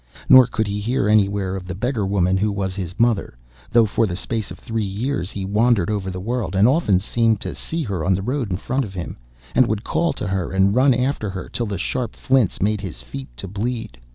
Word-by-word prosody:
Nor 130 Hz, -2 st, +8 dB
could 110 Hz, -2 st, -1 dB
he 100 Hz, 0 st, -3 dB
hear 110 Hz, 0 st, 0 dB
anywhere 100 Hz, -2 st, +2 dB
of 90 Hz, -1 st, -6 dB
the 90 Hz, -, -4 dB
beggar 110 Hz, 0 st, -1 dB
woman 95 Hz, -2 st, +2 dB
who 105 Hz, +2 st, +1 dB
was 95 Hz, -2 st, -2 dB
his 90 Hz, -2 st, -6 dB
mother, 115 Hz, -, +1 dB, 0.3 s
though 115 Hz, -1 st, +5 dB
for 110 Hz, +1 st, +1 dB
the 90 Hz, -, -3 dB
space 110 Hz, +3 st, -2 dB
of -, -, -8 dB
three 115 Hz, -2 st, -3 dB
years 100 Hz, +1 st, -2 dB
he 95 Hz, -2 st, -4 dB
wandered 105 Hz, -1 st, +2 dB
over 100 Hz, -3 st, -2 dB
the 90 Hz, 0 st, -5 dB
world, 115 Hz, 0 st, -2 dB
and 100 Hz, +4 st, +5 dB
often 130 Hz, -, +3 dB
seemed 110 Hz, +2 st, +1 dB
to -, -, -4 dB
see 165 Hz, 0 st, -4 dB
her 95 Hz, -, -3 dB
on 95 Hz, +3 st, +2 dB
the 95 Hz, -, -3 dB
road 125 Hz, 0 st, -2 dB
in 90 Hz, -, -1 dB
front 130 Hz, +7 st, -1 dB
of 100 Hz, -4 st, -8 dB
him, 90 Hz, -, -5 dB, 0.4 s
and 130 Hz, -, +4 dB
would 110 Hz, -1 st, -2 dB
call 165 Hz, +6 st, 0 dB
to -, -, -5 dB
her, 95 Hz, -3 st, -2 dB
and 95 Hz, +1 st, +3 dB
run 130 Hz, +2 st, +4 dB
after 125 Hz, -4 st, -1 dB
her 95 Hz, -1 st, -6 dB
till 120 Hz, -, -2 dB
the 100 Hz, -1 st, -3 dB
sharp 120 Hz, +5 st, -3 dB
flints 130 Hz, -7 st, +1 dB
made 105 Hz, +1 st, +1 dB
his 95 Hz, -9 st, -6 dB
feet 65 Hz, +2 st, -8 dB
to 95 Hz, -, -5 dB
bleed. 105 Hz, -, -4 dB
105 Hz, 235 wpm, -21 LUFS, 95-120 Hz, 0.4 s, Nor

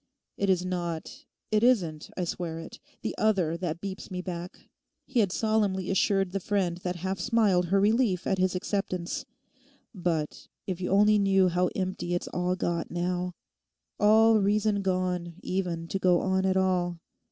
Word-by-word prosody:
'It 200 Hz, -, 0 dB
is 185 Hz, -1 st, +2 dB
not—it 175 Hz, +4 st, -3 dB
isn't, 175 Hz, -12 st, +2 dB
I 180 Hz, -, 0 dB
swear 170 Hz, -1 st, -3 dB
it—the 165 Hz, -, -8 dB
other 190 Hz, -7 st, +2 dB
that 170 Hz, -1 st, -3 dB
keeps 195 Hz, -1 st, -6 dB
me 185 Hz, -2 st, -4 dB
back,' 175 Hz, -1 st, -7 dB, 0.4 s
he 265 Hz, -3 st, 0 dB
had 200 Hz, -5 st, +3 dB
solemnly 205 Hz, -4 st, 0 dB
assured 195 Hz, -1 st, +2 dB
the 195 Hz, -, -1 dB
friend 185 Hz, -3 st, 0 dB
that 180 Hz, 0 st, -3 dB
half 190 Hz, 0 st, -2 dB
smiled 205 Hz, -4 st, +2 dB
her 195 Hz, +3 st, +3 dB
relief 205 Hz, -3 st, +2 dB
at 190 Hz, -, 0 dB
his 185 Hz, 0 st, +1 dB
acceptance, 195 Hz, +5 st, -2 dB, 0.7 s
'but—if 175 Hz, +1 st, -4 dB
you 180 Hz, -, -2 dB
only 210 Hz, +2 st, +5 dB
knew 195 Hz, -2 st, +4 dB
how 180 Hz, +1 st, +1 dB
empty 185 Hz, -2 st, -2 dB
it's 175 Hz, -, -3 dB
all 180 Hz, +1 st, -1 dB
got 175 Hz, -2 st, -2 dB
now; 180 Hz, +1 st, -2 dB, 0.6 s
all 220 Hz, +1 st, +6 dB
reason 205 Hz, +1 st, +2 dB
gone 180 Hz, -2 st, -1 dB
even 175 Hz, -3 st, -2 dB
to 195 Hz, -, -2 dB
go 180 Hz, -2 st, +4 dB
on 190 Hz, 0 st, +1 dB
at 190 Hz, 0 st, +2 dB
all. 180 Hz, -2 st, +1 dB
185 Hz, 155 wpm, -28 LUFS, 175-200 Hz, 0.7 s, all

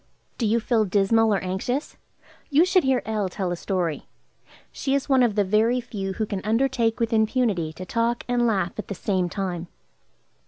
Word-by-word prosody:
Do 230 Hz, -, +1 dB
you 225 Hz, +2 st, +2 dB
feel 225 Hz, -1 st, +1 dB
dismal, 215 Hz, +3 st, +3 dB
or 200 Hz, -, +3 dB
anxious? 195 Hz, +10 st, -3 dB, 0.5 s
You 305 Hz, +3 st, +5 dB
should 370 Hz, 0 st, +3 dB
hear 265 Hz, -2 st, +1 dB
L. 215 Hz, -3 st, -1 dB
tell 185 Hz, 0 st, -3 dB
a -, -, -1 dB
story. 175 Hz, -4 st, -2 dB, 0.6 s
She 270 Hz, 0 st, -1 dB
is 280 Hz, -, -1 dB
one 265 Hz, -2 st, +4 dB
of 235 Hz, -4 st, +2 dB
the 205 Hz, -, +3 dB
very 220 Hz, +5 st, +2 dB
few 195 Hz, -5 st, -5 dB
who 215 Hz, +3 st, -2 dB
can 200 Hz, -2 st, -4 dB
undertake 230 Hz, 0 st, +1 dB
with 230 Hz, -1 st, 0 dB
impunity 220 Hz, -7 st, +1 dB
to 185 Hz, -, -8 dB
talk 230 Hz, +4 st, -1 dB
and 245 Hz, -1 st, +2 dB
laugh 195 Hz, -4 st, -1 dB
at -, -, -5 dB
the 200 Hz, -, -5 dB
same 185 Hz, -1 st, -1 dB
time. 180 Hz, -3 st, -4 dB
220 Hz, 190 wpm, -24 LUFS, 190-240 Hz, 0.6 s, You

